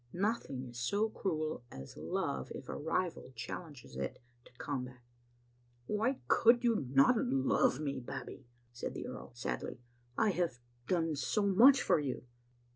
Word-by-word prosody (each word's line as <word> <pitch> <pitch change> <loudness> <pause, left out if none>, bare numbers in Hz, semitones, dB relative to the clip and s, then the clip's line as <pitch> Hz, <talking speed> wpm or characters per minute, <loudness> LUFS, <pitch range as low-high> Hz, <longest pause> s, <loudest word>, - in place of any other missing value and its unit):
Nothing 185 - -1
is 120 0 -8
so 205 - +1
cruel 155 - -2
as 65 0 -9
love 65 - -2
if - - -8
a - - -4
rival 165 -2 -2
challenges 125 - -7
it 65 0 -3 0.3
to - - -18
combat. 125 0 -4 0.9
"Why 225 - +1
could 240 +1 +5
you 230 - +2
not 140 - +5
love 135 - +2
me, 140 -3 -2
Babbie?" 130 0 -7 0.3
said 120 - -5
the - - -4
earl - - -7
sadly. 60 - -3 0.2
" 120 0 -33
I - - +4
have 175 -8 0 0.3
done 165 -3 +1
so 200 - +1
much 240 +8 +7
for - - +4
you." 140 -3 -3
150 Hz, 150 wpm, -34 LUFS, 125-200 Hz, 0.9 s, much